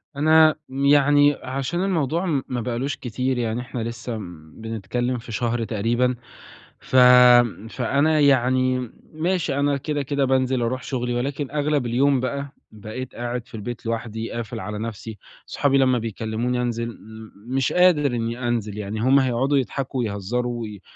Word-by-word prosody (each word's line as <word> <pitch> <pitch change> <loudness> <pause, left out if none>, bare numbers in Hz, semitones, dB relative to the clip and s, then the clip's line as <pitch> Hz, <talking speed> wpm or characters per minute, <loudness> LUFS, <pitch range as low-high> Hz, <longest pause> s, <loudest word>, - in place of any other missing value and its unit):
أنا 155 +1 +5
م 135 +1 -2
يعني 145 0 +5
عشان 135 +8 -3
الموضوع 170 -2 0 0.2
ما 125 -1 -3
بقالوش 125 +4 -2
كتير، 125 +2 -2
يعني 115 0 -1
إحنا 125 0 -6
لسه 115 0 -5 0.4
بنتكلّم 115 +3 -3
في 115 0 -10
شهر 120 0 -1
تقريبًا 120 +4 0 0.6
ف - - -7 0.7
فأنا 140 +6 +1
يعني 130 -2 +2 0.2
ماشي 165 -2 -1
أنا 140 0 +1
كده، 145 +1 -3
كده 140 0 0
بانزِل 130 -1 +1
أرُوح 125 +2 -2
شُغلي 125 -2 -2
ولكن 140 +3 -3
أغلَب 145 -3 0
اليوم 130 +3 +2
بقى 140 +2 -4 0.2
بقيت 110 +4 -8
قاعد 120 0 -4
في - - -11
البيت 115 +2 -6
لوحدي، 115 0 -4
قافل 115 -1 -5
على 105 -1 -5
نفسي، 110 -1 -6 0.3
صحابي 140 -1 +1
لمّا 130 -2 +3
بيكلّموني 115 +3 -2
أنزِل 115 -1 -3 0.5
مش 130 +1 0
قادر 180 -5 +4
إني 120 +2 -3
أنزِل، 110 -3 -2
يعني 105 +1 -4
هُم 130 +4 +4
هيقعُدوا 130 +2 +1
يضحَكوا 135 0 -2
ويهزّروا 120 +3 -2
وي 105 -3 -7
125 Hz, 145 wpm, -23 LUFS, 115-140 Hz, 0.7 s, أنا